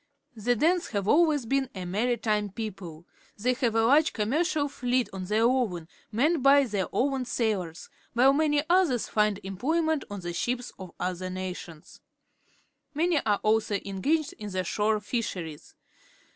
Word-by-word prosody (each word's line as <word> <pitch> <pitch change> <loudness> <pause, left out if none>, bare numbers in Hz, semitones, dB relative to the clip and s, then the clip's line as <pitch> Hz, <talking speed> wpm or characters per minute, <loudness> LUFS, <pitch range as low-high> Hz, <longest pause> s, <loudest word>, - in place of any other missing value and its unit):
The 240 +3 +1
Danes 340 +8 +2
have 200 -2 -1
alwaj 310 +6 +4
s 275 -5 -4
been 270 +2 0
a 185 -1 -5
maritime 210 +1 0
people. 185 -6 -7 0.3
They 250 +5 +1
ha\ 250 - -11
e 245 - +4
a 225 0 +2
large 300 +6 +4
commercial 290 - 0
fleet 250 -3 0
of 185 -1 -5
their 215 +3 +2
own, 230 -10 +1 0.2
manned 280 +6 +1
bj 275 -1 +5
tlieir 195 -3 -1
own 270 0 0
sailors, 195 -9 -2 0.3
while 255 +3 +5
many 295 0 +2
others 345 - +2
hnd 210 -2 +2
employment 305 - 0
on 205 -2 -6
the 175 - -5
.sliips 245 +8 -2
of 185 -2 -8
other 185 0 -3
nations. 180 -4 -7 0.9
Man}' 330 0 +2
are 205 -1 +2
also 215 -1 +2
engaged 280 +11 0
in 210 -1 -6
the 185 -1 -2
shore 210 +4 0
fisherie 200 -7 -3
s. 150 - -18
225 Hz, 160 wpm, -27 LUFS, 195-275 Hz, 0.9 s, bj